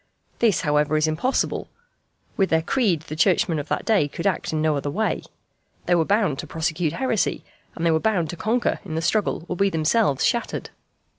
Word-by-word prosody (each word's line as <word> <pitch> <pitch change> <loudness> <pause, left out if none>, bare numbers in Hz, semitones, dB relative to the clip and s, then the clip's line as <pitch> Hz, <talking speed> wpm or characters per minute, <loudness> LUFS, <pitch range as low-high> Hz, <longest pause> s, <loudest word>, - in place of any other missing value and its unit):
This, 220 -7 +3
however, 150 0 +2
is 155 - +2
impossible. 160 +12 -1 0.7
With 195 -2 +1
their 160 0 +2
creed 190 - +1
the 155 -1 -7
Churchmen 165 -1 +2
of 145 - -5
that - - -2
day 210 -10 +3
could 170 +4 -7
act 195 -4 0
in 155 - -1
no 155 -1 +2
other 145 0 -2
way. 215 +9 -1 0.6
They 180 - +2
were 165 -2 +3
bound 200 -8 +1
to - - -5
prosecute 160 -1 -1
heresy, 240 -1 -1 0.3
and 165 - -3
they 165 - +4
were 160 - +3
bound 180 -5 0
to - - -6
conquer 230 +7 0
in 165 -6 -6
the 160 - -1
struggle 180 -1 0
or 180 - -3
be 195 +2 +2
themselves 160 - +1
shattered. 235 - -1
170 Hz, 200 wpm, -23 LUFS, 155-205 Hz, 0.7 s, they